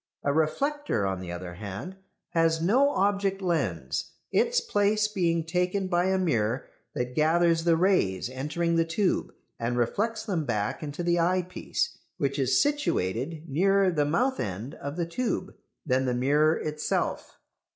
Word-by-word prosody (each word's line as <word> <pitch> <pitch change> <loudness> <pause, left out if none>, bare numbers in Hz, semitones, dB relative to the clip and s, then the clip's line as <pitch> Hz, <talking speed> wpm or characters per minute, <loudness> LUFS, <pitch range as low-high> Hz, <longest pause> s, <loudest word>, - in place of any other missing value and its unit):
A 140 - +1
reflector, 275 - 0
on 95 -1 -1
the 90 -2 -6
other 90 0 -6
hand, 100 - -7 0.3
has 165 -1 +2
no 240 - +4
object 200 -5 +1
lens, 130 - -2 0.2
its - - +3
place 210 +1 +2
being 170 -5 0
taken 180 +3 0
by 175 -1 +1
a 190 0 +2
mirror 125 - 0 0.3
that 125 0 -2
gathers 165 +2 +3
the 165 -1 +4
rays 160 - +2
entering 150 +6 -1
the 165 - +4
tube 170 +4 0 0.3
and 120 +1 -1
reflects 210 - 0
them 185 -7 -1
back 105 -6 -2
into 150 +2 -4
the 175 0 +2
eyepiece, 180 +1 -1 0.2
which 140 0 -1
is 130 -1 +3
situated 165 - -1
nearer 195 +6 +3
the 150 -4 +1
mouth 250 - +1
end 105 - -4
of 140 +1 -6
the 170 - 0
tube 225 +9 -2 0.3
than 130 -2 +1
the 125 -1 0
mirror 150 +5 +3
itself. 150 0 -2
165 Hz, 150 wpm, -27 LUFS, 130-190 Hz, 0.3 s, no